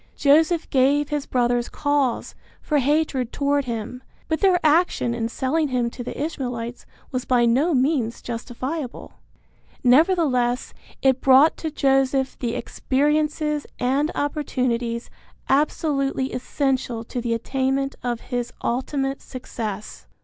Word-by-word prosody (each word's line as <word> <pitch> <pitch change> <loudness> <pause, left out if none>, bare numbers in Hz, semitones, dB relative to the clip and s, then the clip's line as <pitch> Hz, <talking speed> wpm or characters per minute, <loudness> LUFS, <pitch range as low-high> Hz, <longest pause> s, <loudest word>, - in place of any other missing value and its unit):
Joseph 315 +4 +3
gave 280 +2 +3
his 295 -1 -2
brothers 245 -1 +1
cause 285 -4 0 0.3
for 300 -2 0
hatred 280 -3 +1
toward 285 0 +1
him, 235 +1 -5 0.3
but 320 0 0
their 375 -3 +4
action 310 -6 +3
in 230 -1 -2
selling 295 +6 0
him 245 -3 0
to 245 - -7
the - - -6
Ishmaelites 245 -6 -4 0.2
was 255 -1 -2
by 245 -1 +3
no 275 +8 +3
means 255 -3 0
justifiable. 250 +4 -5 0.6
Nevertheless 255 -3 +3 0.3
it 265 -1 +3
brought 270 +4 +6
to 320 - -3
Joseph 270 -2 +1
the 235 -2 -2
experiences 300 +2 0
and 270 +5 +1
opportunities 250 -5 -1 0.4
absolutely 275 -1 +1
essential 255 -2 -1
to 245 +1 -5
the 230 -1 0
attainment 270 +3 -1
of 240 -2 -2
his 245 -1 -3
ultimate 270 +2 -1
success. 220 -5 -6
265 Hz, 120 wpm, -23 LUFS, 245-295 Hz, 0.6 s, brought